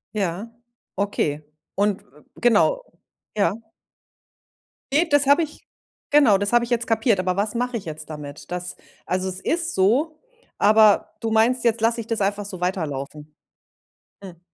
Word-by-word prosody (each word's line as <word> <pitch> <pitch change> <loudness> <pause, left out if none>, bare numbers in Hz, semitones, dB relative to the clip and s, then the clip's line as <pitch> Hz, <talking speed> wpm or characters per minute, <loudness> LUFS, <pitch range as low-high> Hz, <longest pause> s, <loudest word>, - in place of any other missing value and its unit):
Ja, 195 +2 -2 0.5
okay. 155 -7 -1 0.3
Und, 200 0 0
w 145 +4 -23
genau, 240 - +2 0.5
ja. 200 -3 +2 1.4
Ne, 315 +5 +4
das 290 -3 +3
habe 285 +4 +4
ich 310 - -9 0.4
genau, 280 -9 +5
das 205 +2 -1
habe 240 0 +4
ich 235 - -12
jetzt 240 -1 0
kapiert. 225 -3 +2
Aber 185 0 -1
was 210 +3 -1
mache 245 0 -1
ich 200 - -9
jetzt 155 -1 -7
damit? 150 +1 -9
Das 180 0 -3 0.3
also, 185 +1 -1
es 185 0 -1
ist 335 - +1
so, 270 - +1 0.4
aber 215 0 +4
du 225 -1 -2
meinst, 235 +3 +2
jetzt 235 -1 +2
lasse 230 +1 +1
ich 220 - -11
das 230 -2 -1
einfach 200 +1 0
so 190 -3 -5
weiterlaufen. 150 -4 -4 0.9
Hm. 180 -4 -11
205 Hz, 155 wpm, -22 LUFS, 180-240 Hz, 1.4 s, genau